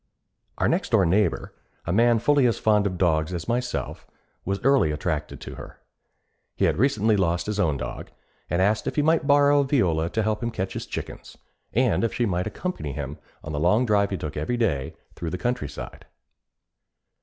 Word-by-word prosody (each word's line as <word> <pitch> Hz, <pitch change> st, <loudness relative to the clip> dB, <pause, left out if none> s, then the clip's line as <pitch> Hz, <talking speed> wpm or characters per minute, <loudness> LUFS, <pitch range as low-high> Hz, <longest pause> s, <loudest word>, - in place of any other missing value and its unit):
Our -, -, +1 dB
next -, -, 0 dB
door -, -, +4 dB
neighbor, 95 Hz, +1 st, +1 dB, 0.3 s
a 85 Hz, -, -1 dB
man 115 Hz, +3 st, +4 dB
fully 140 Hz, +2 st, +3 dB
as 115 Hz, -, 0 dB
fond 105 Hz, -2 st, +3 dB
of 90 Hz, -2 st, -4 dB
dogs 85 Hz, -1 st, +1 dB
as 85 Hz, -2 st, -5 dB
myself, 120 Hz, +1 st, -3 dB, 0.4 s
was 100 Hz, +1 st, -1 dB
early 135 Hz, -, +4 dB
attracted 75 Hz, 0 st, -3 dB
to -, -, -8 dB
her. -, -, -11 dB, 0.8 s
He -, -, +1 dB
had -, -, +1 dB
recently 110 Hz, -4 st, +3 dB
lost 85 Hz, -3 st, 0 dB
his 105 Hz, 0 st, -3 dB
own 80 Hz, -8 st, +1 dB
dog, -, -, -6 dB, 0.4 s
and 85 Hz, +3 st, +2 dB
asked 105 Hz, +2 st, +1 dB
if -, -, -2 dB
he 150 Hz, -, +2 dB
might 160 Hz, -1 st, +2 dB
borrow 145 Hz, 0 st, +5 dB
Viola 90 Hz, -, +1 dB
to 110 Hz, -, -1 dB
help 105 Hz, 0 st, -1 dB
him 115 Hz, -, -1 dB
catch 95 Hz, -4 st, -4 dB
his -, -, -5 dB
chickens, -, -, -7 dB, 0.3 s
and 125 Hz, +1 st, +2 dB
if 115 Hz, -, -1 dB
she 120 Hz, -, +1 dB
might 90 Hz, -3 st, -1 dB
accompany 130 Hz, -, -4 dB
him 75 Hz, +1 st, -6 dB, 0.2 s
on 75 Hz, -, -6 dB
the 75 Hz, -, -2 dB
long 95 Hz, +10 st, +3 dB
drive 100 Hz, -3 st, +2 dB
he 95 Hz, -, -2 dB
took 75 Hz, -3 st, -6 dB
every 75 Hz, +12 st, -2 dB
day 70 Hz, -, -1 dB, 0.2 s
through 85 Hz, -, -5 dB
the 90 Hz, -, -3 dB
countryside. 120 Hz, -, -4 dB
100 Hz, 190 wpm, -25 LUFS, 85-120 Hz, 0.8 s, borrow